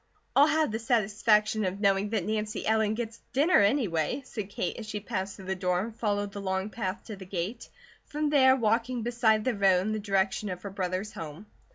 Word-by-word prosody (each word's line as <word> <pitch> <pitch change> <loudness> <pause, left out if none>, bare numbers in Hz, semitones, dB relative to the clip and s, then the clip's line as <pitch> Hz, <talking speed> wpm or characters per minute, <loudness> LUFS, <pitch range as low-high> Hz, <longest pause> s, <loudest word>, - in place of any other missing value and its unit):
"I'll 285 +2 +7
have 310 -4 +2
the 220 - -2
satisfaction 215 -2 +2
of 190 +1 -2
knowing 200 0 +2
that 210 -5 -1
Nancy 215 0 -2
Ellen 220 -1 +2
gets 230 0 -5
dinner, 305 +7 +4
anyway," 200 - +1
said 210 -5 -6
Kate 185 - -3
as 220 - -7
she 215 -1 -3
passed 195 -1 -4
through 190 - -11
the 190 - -1
door 180 -1 0
and 220 +3 -4
followed 205 -3 -1
the 200 - -6
long 190 +1 -2
path 200 -2 -4
to 215 - -7
the 190 -1 -10
gate, 190 +5 -4 0.4
from 300 0 -1
there 260 -3 +6
walking 235 0 0
beside 230 -2 +2
the 255 - +2
road 195 -3 +3
in 210 +3 -2
the 215 - -1
direction 200 0 0
of 180 -1 -6
her 200 - -5
brother's 185 +2 -3
home. 160 +5 -8
210 Hz, 210 wpm, -28 LUFS, 195-230 Hz, 0.4 s, I'll